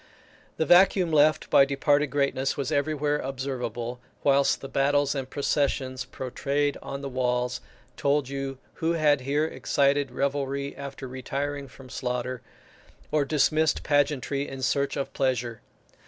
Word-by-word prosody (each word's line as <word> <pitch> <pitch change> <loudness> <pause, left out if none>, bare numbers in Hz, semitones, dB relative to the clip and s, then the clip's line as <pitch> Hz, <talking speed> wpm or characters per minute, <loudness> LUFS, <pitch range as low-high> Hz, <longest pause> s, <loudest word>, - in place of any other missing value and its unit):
The 160 - +1
vacuum 180 0 +5
left 155 0 +3
by 140 - +7
departed 145 +2 +2
greatness 140 -1 0
was 140 -3 -2
everywhere 150 0 0
observable, 125 -3 -4 0.2
whilst 140 0 +3
the 135 - -6
battles 140 +1 +2
and 135 -2 -4
processions 135 -2 -1
portrayed 140 +3 -2
on 140 0 -6
the 140 - -4
walls 125 -1 -1 0.4
told 140 -1 +1
you 135 0 -4 0.2
who 165 +1 +2
had 150 -4 +3
here 145 +4 +1
excited 140 -2 +1
revelry 140 +1 -2
after 140 -1 -7
retiring 140 +2 -4
from 130 0 -14
slaughter, 125 0 -3 0.7
or 150 -2 +2
dismissed 155 +2 +2
pageantry 145 -1 +1
in 135 -1 -7
search 140 +2 0
of 140 - -3
pleasure. 125 -4 -1
140 Hz, 135 wpm, -26 LUFS, 130-145 Hz, 0.7 s, by